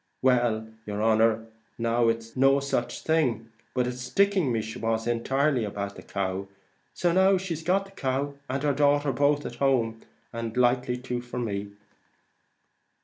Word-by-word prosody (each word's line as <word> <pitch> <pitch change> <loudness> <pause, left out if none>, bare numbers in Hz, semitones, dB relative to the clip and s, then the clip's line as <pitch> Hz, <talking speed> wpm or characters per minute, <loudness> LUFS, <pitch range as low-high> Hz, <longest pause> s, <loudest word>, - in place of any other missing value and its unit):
Well, 120 -4 +2 0.2
yer 105 0 -3
honer, 110 0 +3 0.3
now 115 0 +2
it's 115 0 -2
no 135 +1 +4
such 135 -3 -2
thing, 125 -9 +1 0.2
but 125 -1 +2
it's 125 0 -4
sticking 185 +3 +2
me 115 -2 0
she 110 +1 -7
was 115 0 -1
entirely 130 +3 +1
about, 100 -1 -4
the - - -10
cow: 95 0 -3 0.4
so 175 -1 0
now 190 +2 +4
she 185 -2 -3
got 190 +3 +2
the 195 - -15
cow 140 -4 -2 0.2
and 135 +2 -2
her 145 -1 +2
daughter 145 0 +2
both 145 +3 +2
at 120 - -6
home; 120 -4 +1 0.3
and 115 0 -4
likely 125 0 +2
to 125 -1 -4
for 120 0 -8
me." 100 -4 -3
125 Hz, 160 wpm, -27 LUFS, 115-140 Hz, 0.4 s, no